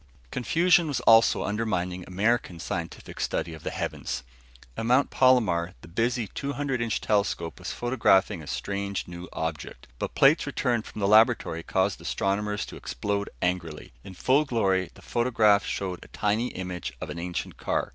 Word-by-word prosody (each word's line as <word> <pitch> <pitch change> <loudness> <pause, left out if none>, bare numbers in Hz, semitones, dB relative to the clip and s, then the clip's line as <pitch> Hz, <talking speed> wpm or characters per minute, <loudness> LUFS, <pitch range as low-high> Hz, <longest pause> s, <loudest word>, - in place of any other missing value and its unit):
Confusion 170 +6 +3
was 145 - -1
also 115 0 +5
undermining 95 -4 -2
American 100 -2 0
scientific 85 0 -5
study 85 - -2
of 80 - -10
the - - -3
heavens. - - -4 0.5
At 115 - -3
Mount 125 +3 +3
Palomar 100 -9 +3
the - - -12
busy 115 +6 0
200 140 +2 -3
inch 115 -2 0
telescope 100 -5 0
was - - -5
photographing 110 -8 +2
a 75 - -11
strange 100 +1 -3
new 85 +1 -8
object, 80 -3 -5
but - - -4
plates 145 +3 +5
returned 120 -5 0
from 105 - -8
the 100 - +2
laboratory 110 -5 +4
caused 95 +3 0
astronomers 105 +1 -1
to - - -10
explode 100 0 -3
angrily. 85 -7 -2
In 95 - -10
full 135 +10 +3
glory, 95 -9 +1
the - - -16
photograph 110 -4 +3
showed 90 -2 -3
a - - -14
tiny 110 +3 0
image 90 -5 -5
of - - -5
an 85 - -6
ancient 90 0 -4
car. - - -1
100 Hz, 160 wpm, -27 LUFS, 90-120 Hz, 0.5 s, also